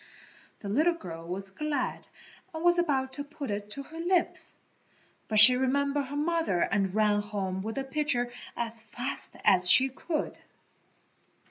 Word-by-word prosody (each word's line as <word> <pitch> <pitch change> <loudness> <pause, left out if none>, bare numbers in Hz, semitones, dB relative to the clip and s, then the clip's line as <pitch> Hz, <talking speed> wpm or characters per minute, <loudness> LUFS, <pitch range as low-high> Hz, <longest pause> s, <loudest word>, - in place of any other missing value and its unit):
The 205 - -8
little 310 +12 +1
girl 165 - -10
was 190 +2 -5
glad 300 +6 -4 0.5
and 320 - -6
was 350 0 +3
about 265 -6 -1
to 285 - -6
put 285 -4 -8
it 205 0 -5
to 275 +6 -4
her 320 +4 -12
lips, 350 +1 +1 0.7
but 215 - -2
she 225 +4 +11
remembered 280 +2 -1
her 285 - -8
mother 325 - -1
and 195 -1 -1
ran 210 -1 +1
home 195 -3 -5
with 220 +3 -6
the 275 - -3
pitcher 270 -3 -2 0.3
as 230 -1 -2
fast 245 +5 -3
as 180 0 +6
she 265 +6 +7
could. 305 +4 -5
260 Hz, 155 wpm, -27 LUFS, 205-295 Hz, 0.7 s, she